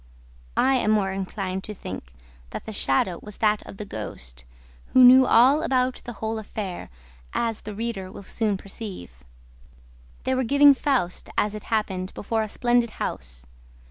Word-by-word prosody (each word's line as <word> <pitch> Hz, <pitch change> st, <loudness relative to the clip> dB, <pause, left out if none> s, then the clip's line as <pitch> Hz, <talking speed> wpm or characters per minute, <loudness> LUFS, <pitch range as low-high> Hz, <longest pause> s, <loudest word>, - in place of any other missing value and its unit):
I 270 Hz, 0 st, +4 dB
am 225 Hz, -, 0 dB
more 205 Hz, -3 st, +2 dB
inclined 190 Hz, 0 st, -3 dB
to 210 Hz, -, -6 dB
think 90 Hz, -, -8 dB, 0.4 s
that -, -, -7 dB
the 220 Hz, -, -6 dB
shadow 170 Hz, +1 st, 0 dB
was 210 Hz, -1 st, -8 dB
that 210 Hz, -1 st, +2 dB
of -, -, -10 dB
the 210 Hz, -, -6 dB
ghost, 65 Hz, -, -7 dB, 0.5 s
who 255 Hz, -, +8 dB
knew 255 Hz, +1 st, +9 dB
all 265 Hz, +6 st, +6 dB
about 255 Hz, -2 st, 0 dB
the 240 Hz, -, -6 dB
whole 220 Hz, +1 st, -3 dB
affair, 205 Hz, -4 st, -6 dB, 0.4 s
as 230 Hz, -2 st, -1 dB
the 210 Hz, -1 st, -7 dB
reader 210 Hz, -4 st, -4 dB
will 200 Hz, -, -10 dB
soon 210 Hz, 0 st, -1 dB
perceive. 190 Hz, -, -9 dB, 1.0 s
They 260 Hz, -, 0 dB
were 260 Hz, 0 st, +1 dB
giving 280 Hz, +3 st, +7 dB
FAUST, 260 Hz, -10 st, -1 dB
as 210 Hz, 0 st, +2 dB
it 215 Hz, -, -7 dB
happened, 195 Hz, -4 st, -2 dB
before 225 Hz, +2 st, -1 dB
a 215 Hz, -, -3 dB
splendid 240 Hz, +1 st, +2 dB
house. -, -, -5 dB
210 Hz, 165 wpm, -25 LUFS, 190-240 Hz, 1.0 s, knew